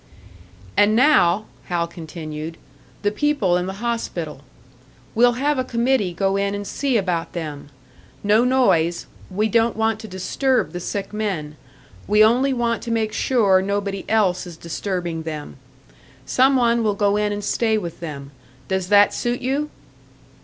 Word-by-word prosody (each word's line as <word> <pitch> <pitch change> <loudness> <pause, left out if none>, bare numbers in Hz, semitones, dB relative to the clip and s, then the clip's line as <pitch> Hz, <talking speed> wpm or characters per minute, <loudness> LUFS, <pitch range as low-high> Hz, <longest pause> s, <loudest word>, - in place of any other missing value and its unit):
"And 205 +1 +4
now," 220 - +4 0.2
Hal 170 -1 -1
continued, 160 -1 -7 0.5
"the 205 - +2
people 215 -6 +1
in 180 +1 -1
the 190 - -4
hospital. 170 - -3 0.7
We'll 240 +2 +4
have 280 +3 0
a - - +1
committee 235 -5 +1
go 195 +3 0
in 200 0 0
and 205 0 -5
see 265 +3 0
about 180 -5 -2
them. 150 -4 -6 0.5
No 210 +3 +4
noise 180 -10 +2 0.2
we 210 +4 0
don't 230 +1 +2
want 220 -1 +1
to 220 - -8
disturb 245 +7 0
the 175 - -5
sick 200 +3 -4
men. 185 -9 -3 0.5
We 210 +1 +5
only 250 +5 +4
want 235 -2 0
to 235 - -6
make 220 -1 0
sure 200 -7 +3
nobody 200 0 -2
else 190 -5 +2
is 170 -2 -10
disturbing 170 0 -3
them. 155 -3 -6 0.7
Some 260 - +3
one 235 -2 +3
will 210 -2 +1
go 200 0 +2
in 210 0 +1
and 205 0 -4
stay 220 +1 +1
with 170 -5 -5
them. 140 -4 -7 0.4
Does 190 +1 -1
that 205 0 +6
suit 240 0 -1
you?" 275 +4 -1
205 Hz, 155 wpm, -22 LUFS, 175-235 Hz, 0.7 s, that